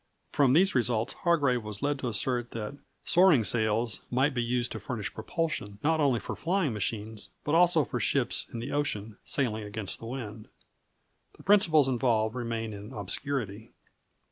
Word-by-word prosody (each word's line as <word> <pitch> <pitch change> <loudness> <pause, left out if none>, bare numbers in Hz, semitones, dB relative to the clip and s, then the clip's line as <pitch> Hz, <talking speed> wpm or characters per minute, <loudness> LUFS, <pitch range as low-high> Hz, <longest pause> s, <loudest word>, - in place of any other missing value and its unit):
From 135 -3 +3
these 185 +6 +4
results 120 -2 +1
Hargrave 140 -9 +1
was 105 +2 -7
led 145 -1 0
to 130 - -3
assert 120 +2 0
that 115 +4 -5 0.3
"soaring 175 -9 +5
sails" 110 0 +1
might 135 +4 +2
be 120 - 0
used 120 +1 -1
to - - -5
furnish 115 -5 -4
propulsion, 110 - -3
not 160 +1 +2
only 135 -6 +3
for - - -5
flying 175 - 0
machines, 105 +1 -3
but 150 - -1
also 170 -3 +5
for 125 - -3
ships 125 +3 +1
on - - -6
the 115 - -5
ocean 110 -8 -2
sailing 110 -6 -1
against 105 -1 -4
the 115 - -8
wind. 115 -4 -6 0.9
The - - -15
principles 165 -8 +5
involved 115 -4 +1
remain 115 -3 -3
in 105 +4 -9
obscurity. 110 0 -4
120 Hz, 165 wpm, -29 LUFS, 110-145 Hz, 0.9 s, soaring